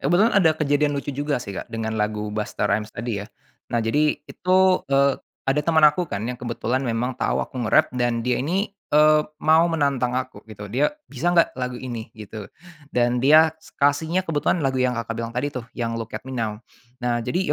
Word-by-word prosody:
Kebetulan 175 +10 +3
ada 185 -6 +5
kejadian 145 -1 +1
lucu 140 - -3
juga 145 0 -1
sih 100 -3 -7
Kak, - - -7
dengan 110 -1 -3
lagu 105 0 -2
Busta 105 -1 -2
Rhymes 105 +2 -1
tadi 115 -4 -4
ya. - - -9 0.4
Nah, 120 - +1
jadi 150 +7 +1
itu, 185 +1 +1 0.3
eee, 140 0 +4 0.3
ada 135 +2 +2
teman 160 -1 +3
aku 170 +4 +2
kan 100 -9 -4
yang 125 -1 -5
kebetulan 120 +1 -2
memang 120 +1 -1
tahu - - 0
aku - - -10
nge-rap - - +4
dan 120 -2 0
dia 125 +1 0
ini, 185 +9 -1 0.2
eee, 150 0 +6 0.2
mau 160 +2 +5
menantang 140 -6 0
aku 130 -5 -7
gitu. 105 -2 -9
Dia, 130 +7 +2 0.2
"Bisa 150 +6 -1
nggak 170 -1 +3
lagu 125 -1 -3
ini?" 120 -3 -6
gitu. 105 -1 -8 0.5
Dan 120 0 +2
dia 155 +3 +6 0.3
kasihnya 160 +6 +2
kebetulan 160 +2 +1
lagu 135 -1 0
yang 125 0 +2
Kakak 115 0 -4
bilang 115 0 -4
tadi 130 +4 0
tuh, 125 -2 -4
yang 115 -1 -3
Look 115 -1 -6
at - - -5
Me 130 - -6
Now. 110 -3 -3 0.4
Nah, 120 -1 0
jadi 180 - -1
130 Hz, 200 wpm, -23 LUFS, 115-150 Hz, 0.5 s, eee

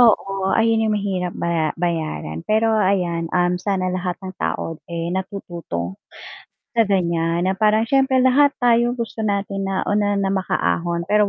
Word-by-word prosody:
Oo, 195 -4 +3
ayon 225 0 +3
'yong 210 - +1
mahirap 185 -3 -2
baya 165 -2 0
bayaran, 160 - -2
pero 220 +1 +3
ayan 180 -5 +1
um, 180 0 +1
sana 185 -2 -1
lahat 180 -1 -2
ng 185 - -5
tao 165 -1 -3
eh, 170 0 -3
natututo 170 - -5 0.7
sa 230 -3 +2
ganyan 170 -2 +1
na 190 - +2
parang 215 +2 +2
s'yempre 265 +2 +2
lahat 280 +3 +5
tayo 240 0 +2
gusto 230 -1 -5
natin 200 -2 -1
na 195 -1 -1
una 205 0 +1 0.2
makaahon 170 - 0
pero 210 +2 +3
190 Hz, 150 wpm, -21 LUFS, 170-215 Hz, 0.7 s, lahat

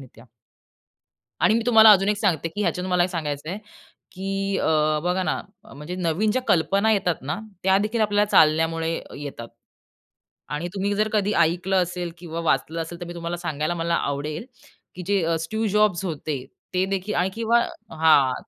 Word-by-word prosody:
रित्या. 125 -3 -15 1.2
आणि - - +5
मी 230 - +2
तुम्हाला 220 -2 +8
अजून 195 0 +4
एक 210 - +1
सांगते 175 -7 0
की 205 - -5
ह्याच्यात 185 -2 -1
मला 180 -1 +2
एक 185 - -1
सांगायचं 155 -3 -4
आहे, 195 - -4 0.5
की 195 +1 -2
अ, 155 -1 +2
बघा 180 +1 0
ना 155 - -1 0.2
अ, - - -15
म्हणजे 150 +6 -7
नवीन 185 +4 0
ज्या 255 - 0
कल्पना 195 +6 +2
येतात 180 -5 +1
ना 150 +8 -3 0.2
त्या 190 0 +4
देखील 215 +3 -1
आपल्याला 205 0 +2
चालण्यामुळे 160 +1 +3 0.3
येतात 135 -5 -7 1.0
आणि 160 +4 -3
तुम्ही 200 +1 0
जर 215 +1 +1
कधी 210 0 +1
ऐकलं 180 +3 +2
असेल 175 -1 -5
किंवा 170 -1 -6
वाचलं 160 +5 0
असेल 170 +1 -7
तर - - -4
मी 175 - -7
तुम्हाला 170 0 -4
सांगायला 160 -1 -2
मला 170 0 0
आवडेल, 150 - -3 0.5
की 180 - -7
जे 170 -5 +1
स्टीव्ह 220 +7 -2
जॉब्स 210 -3 +2
होते, 150 -5 -4 0.3
ते 185 +1 +2
देखील 195 +2 -3
आणि 180 +2 +1
किंवा 230 +1 +2 0.4
हां 145 -5 +5
175 Hz, 175 wpm, -24 LUFS, 160-200 Hz, 1.2 s, तुम्हाला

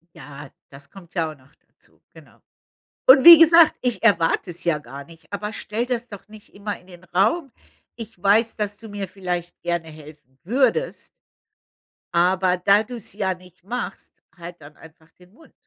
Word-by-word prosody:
Ja, 145 -1 -12 0.2
das 140 +1 -15
kommt 180 -4 -16
ja 165 -3 -1
auch 155 - -16
noch 130 +2 -26
dazu, - - -29
genau. - - -19 0.7
Und 260 0 +7
wie 340 -1 +12
gesagt, 330 0 +6
ich 245 -2 -2
erwarte 180 -5 +2
es 175 - -10
ja 170 -3 +1
gar 140 -1 -11
nicht, 165 +3 -19
aber 210 +1 -5
stelle 220 +2 -4
das 245 -1 -4
doch 205 -2 -12
nicht 215 -1 -16
immer 205 +1 -6
in 180 - -23
den 175 -1 -15
Raum. 215 - 0 0.4
Ich 225 -5 -11
weiß, 220 +3 +2
dass 205 -1 -4
du 225 +1 -13
mir 205 -2 -6
vielleicht 180 -2 -6
gerne 170 -1 -3
helfen 150 -4 -16
würdest 270 - -1 1.0
aber 180 +1 +1
da 200 +3 +3
du's 230 -2 -7
ja 190 -2 -2
nicht 180 0 -20
machst, 235 -1 -6 0.2
halt 175 0 -11
dann 150 0 -15
einfach 160 0 -19
den 180 +1 -23
Mund. 315 +8 -21
190 Hz, 175 wpm, -22 LUFS, 170-220 Hz, 1.0 s, wie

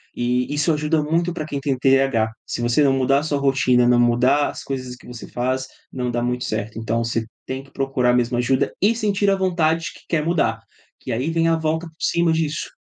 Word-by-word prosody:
e 125 +1 0
e - - -1
isso 150 +3 +2
ajuda 150 +1 +1
muito 165 +3 0
para 155 -3 -4
quem 145 -2 -4
tem 135 -2 -1
TH. 135 -4 +3 0.2
Se - - -4
você 120 +5 +2
não 140 - +4
mudar 135 +1 +2
a - - -5
sua 145 -2 -1
rotina, 130 -3 +3
não 120 0 +4
mudar 125 +4 +3
as - - -7
coisas 130 -2 -5
que - - -17
você 120 -1 -8
faz, 130 +2 -2 0.3
não 125 -1 -2
dá 120 0 -1
muito 125 +1 -1
certo, 110 0 -3
então 115 +1 -1
você 115 0 -2 0.2
tem 130 +1 -5
que 135 - -20
procurar 135 -2 +1
mesmo 120 0 +1
ajuda 130 +2 +1
e 205 +4 +4
sentir 205 -3 +1
a 195 - +3
vontade 165 -3 +1
que - - -16
quer 155 -2 0
mudar, 155 -9 +1 0.4
que - - -6
aí 130 +7 -1
vem 165 0 +1
a 165 - +3
volta 160 +1 -1
por 160 - -17
cima 170 -1 +2
disso, 155 -2 -2
135 Hz, 230 wpm, -21 LUFS, 125-160 Hz, 0.4 s, não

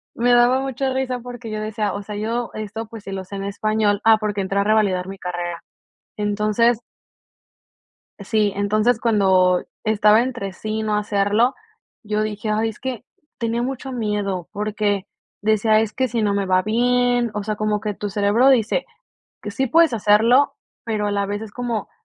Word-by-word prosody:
me 245 +1 +2
daba 245 +2 +4
mucha 270 0 -2
risa 260 -1 -2
porque 245 -2 -8
yo 215 - -3
decía, 215 -1 -2
o 200 - -4
sea, 210 +1 -7
yo 230 +3 -2
esto, 215 +1 -5
pues, 225 -2 -10
si 195 - -6
lo 190 -1 -4
sé 200 - -9
en 195 - -4
español, 205 0 0
ah, 225 -1 +7
porque 210 -2 -2
entré 195 +1 -2
a - - +3
revalidar 205 -4 +2
mi 195 0 -7
carrera. 175 -1 -4 0.6
Entonces. 215 +3 +1 1.4
Sí, 205 0 0
entonces, 215 +3 +1
cuando 190 -5 +3 0.2
estaba 215 0 +4
entre 240 -7 -4
sí 215 +3 -4
y - - -2
no 215 -1 0
hacerlo, 210 +4 +2 0.5
yo 210 0 -1
dije, 215 0 -3
ay 220 +1 +1
es 220 - -10
que 250 -3 -5 0.3
tenía 230 0 -1
mucho 265 +1 -4
miedo 205 -6 -2
porque 205 -1 -1 0.4
decía: 215 +1 +3
"Es 220 -1 -2
que 260 +3 0
sí 235 -1 -2
no 205 -1 +1
me 200 -1 0
va 185 0 +3
bien", 245 +2 +2
o 210 - -3
sea, 210 0 -3
como 210 -1 0
que 210 -1 -2
tu 205 +1 -5
cerebro 205 +5 +3
dice 245 - +2 0.6
que 210 - -5
sí 265 +6 -1
puedes 330 +3 +5
hacerlo, 230 +5 +4 0.3
pero 215 -2 -1
a 205 - -1
la 200 0 0
vez 205 +1 -4
es 220 -2 -8
como: 235 -2 -3
215 Hz, 185 wpm, -21 LUFS, 205-235 Hz, 1.4 s, ah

